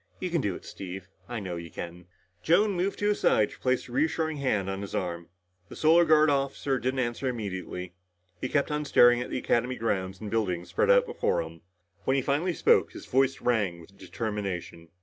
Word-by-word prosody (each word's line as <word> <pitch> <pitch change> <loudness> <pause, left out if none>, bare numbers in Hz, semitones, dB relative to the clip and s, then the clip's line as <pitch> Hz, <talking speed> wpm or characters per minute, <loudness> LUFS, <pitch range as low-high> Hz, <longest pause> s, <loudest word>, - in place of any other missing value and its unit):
"You 180 - -3
can 170 -3 +1
do 100 -6 -1
it, - - -11
Steve. 95 -1 -8 0.2
I 120 -2 -3
know 90 -4 -5
you 85 0 -7
can." 85 +1 -8 0.3
Joan 200 - +3
moved 190 +1 -1
to 205 - +1
his 210 - 0
side 105 - +3
to - - -13
place 130 -1 0
a - - -12
reassuring 160 +3 0
hand 110 -9 0
on 95 0 -3
his 100 - -6
arm. 85 -2 -3 0.4
The - - -9
Solar 165 +2 +5
Guard 155 -1 +5
officer 140 -1 0
didn't 130 +2 -1
answer 120 +2 -2
immediately. 95 -6 -4 0.5
He 130 - -2
kept 145 0 +1
on 150 0 -1
staring 120 -4 +5
at - - -5
the - - -2
Academy 125 0 0
grounds 95 -5 -2
and 105 -2 -6
buildings 90 -6 -1
spread - - +1
out - - +6
before 460 - 0
him. 80 0 -11 0.4
When 130 - +2
he 135 - +1
finally 160 +5 0
spoke, - - +3
his - - -9
voice 135 +1 +1
rang 105 -8 +1
with 85 +4 -16
determination. 100 -6 -5
120 Hz, 210 wpm, -28 LUFS, 95-145 Hz, 0.5 s, out